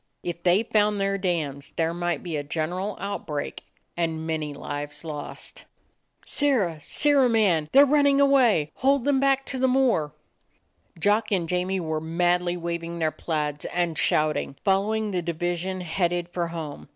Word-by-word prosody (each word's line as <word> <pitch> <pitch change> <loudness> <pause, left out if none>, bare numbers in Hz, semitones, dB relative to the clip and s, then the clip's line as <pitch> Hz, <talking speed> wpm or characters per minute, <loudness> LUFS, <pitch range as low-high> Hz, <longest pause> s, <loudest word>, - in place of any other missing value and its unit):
If 170 -1 -4
they 180 +5 +3
found 210 -2 +1
their 195 0 0
dams, 155 -7 -2
there 165 0 0
might 175 0 -2
be 170 -3 -4
a 145 - -1
gen 155 +2 -2
eral 190 +3 -3
outbreak 165 -7 -4 0.3
and 160 -2 -2
many 155 -2 -2
lives 145 +2 -6
lost. 150 -2 -8 0.6
"Sirrah! 225 - +1
Sirrah 280 - +3
man! 185 -9 +2
They're 280 +2 +8
running 285 -1 +4
away. 250 - +4
Hold 270 0 +2
them 280 0 +2
back 275 0 +2
to 260 - -2
the 260 - +3
moor 250 - +2 0.4
!" - - -28
Jock 210 +5 +2
and 180 -4 +1
Jamie 180 +2 0
were 160 -2 -2
madly 175 +2 +1
waving 170 0 -4
their 160 -2 0
plaids 150 -1 -3
and 175 -2 -1
shouting, 155 -2 +1
following 210 +2 +1
the 180 -2 -1
division 175 +2 -2
headed 175 0 -1
for 175 -1 -2
home. 160 -4 -7
175 Hz, 160 wpm, -25 LUFS, 160-210 Hz, 0.6 s, They're